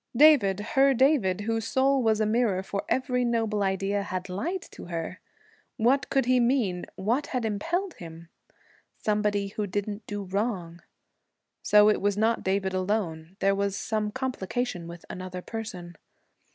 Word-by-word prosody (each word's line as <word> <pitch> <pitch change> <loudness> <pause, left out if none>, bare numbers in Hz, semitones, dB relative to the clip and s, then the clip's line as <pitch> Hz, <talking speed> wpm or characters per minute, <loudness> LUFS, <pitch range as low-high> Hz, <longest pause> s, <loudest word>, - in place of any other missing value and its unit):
David, 255 -10 +6
her 270 0 +5
David, 235 -8 +3
whose 225 +1 -1
soul 270 +2 +2
was 220 -2 +2
a 215 - +2
mirror 215 -4 +1
for 200 0 -3
every 250 -1 +1
noble 225 -3 0
idea, 195 +1 0
had 185 -1 -4
lied 335 - -3
to - - -10
her! 165 -2 -5 0.6
What 245 +3 +2
could 270 -2 +2
he 255 0 +4
mean? 235 -8 +1
What 235 +9 0
had 250 -3 -2
impelled 335 - -1
him? 165 0 -11 0.7
Somebody 210 -1 0
who 210 +1 -3
didn't 205 +2 -4
do 205 -1 -4
wrong. 185 -4 -3 0.8
So 210 0 +6
it 215 - +3
was 205 0 +1
not 225 +2 +1
David 190 0 0
alone; 185 -3 -2
there 195 0 +4
was 200 0 -1
some 215 0 -1
complication 245 -6 -3
with 170 0 -10
another 185 0 -6
person. 185 -6 -7
210 Hz, 150 wpm, -27 LUFS, 190-245 Hz, 0.8 s, David